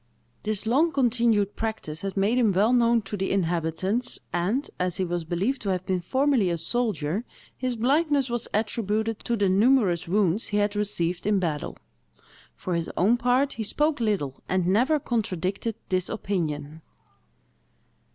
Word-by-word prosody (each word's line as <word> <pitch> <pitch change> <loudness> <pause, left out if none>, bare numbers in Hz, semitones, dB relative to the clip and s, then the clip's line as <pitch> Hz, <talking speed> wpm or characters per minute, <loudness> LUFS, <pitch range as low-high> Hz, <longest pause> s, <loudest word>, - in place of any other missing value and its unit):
This 215 0 0
long 290 +9 +3
continued 235 -6 +2
practice 220 -8 -4
had 195 0 -4
made 210 +6 +2
him 225 -4 +4
well 210 +6 +3
known 235 -2 +3
to 205 - -5
the 190 -1 -2
inhabitants, 180 +5 -1 0.2
and, 200 - 0
as 180 -1 -1
he 185 - 0
was 175 -1 -2
believed 195 +11 -1
to 200 - -3
have 185 -1 -1
been 185 -2 0
formerly 260 0 +2
a 170 - 0
soldier, 200 -2 -1 0.3
his 255 -1 -2
blindness 280 +3 +2
was 240 -1 -3
attributed 220 0 -1
to 235 -1 -2
the 200 -2 +2
numerous 195 -3 +3
wounds 200 +2 +1
he 210 - -1
had 205 0 +1
received 180 -3 -1
in 210 -1 +3
battle. 160 -6 -2 0.8
For 185 - -4
his 170 -1 -1
own 220 +7 +4
part, 250 +3 +2
he 225 - -4
spoke 295 +7 0
little, 195 - -1
and 185 -1 +1
never 250 - +3
contradicted 205 - -2
this 185 -1 0
opinion. 160 -7 -3
205 Hz, 160 wpm, -26 LUFS, 180-235 Hz, 0.8 s, him